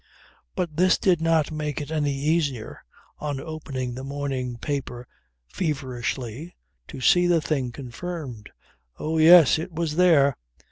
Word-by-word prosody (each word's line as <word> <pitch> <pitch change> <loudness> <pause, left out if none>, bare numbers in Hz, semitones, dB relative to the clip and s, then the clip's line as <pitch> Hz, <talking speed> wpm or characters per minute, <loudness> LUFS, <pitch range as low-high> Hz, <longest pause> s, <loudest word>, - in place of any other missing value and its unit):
But 160 -4 -3
this 185 +1 +4
did 180 -4 +2
not 165 -2 +2
make 150 -1 -3
it 145 0 -6
any 150 -2 0
easier, 145 -5 -1 0.4
on 145 -2 -3
opening 135 -5 -5
the 130 +2 -7
morning 135 -3 -4
paper 125 -3 -4 0.4
feverishly, 130 - -4 0.3
to - - -9
see 175 +7 +4
the 175 -1 +4
thing 140 -5 -2
confirmed. 130 - -7 0.5
Oh 160 +1 -2
yes! 160 -2 +7
It 175 +3 -5
was 160 -1 -3
there. 155 -7 +4
150 Hz, 135 wpm, -24 LUFS, 130-165 Hz, 0.5 s, yes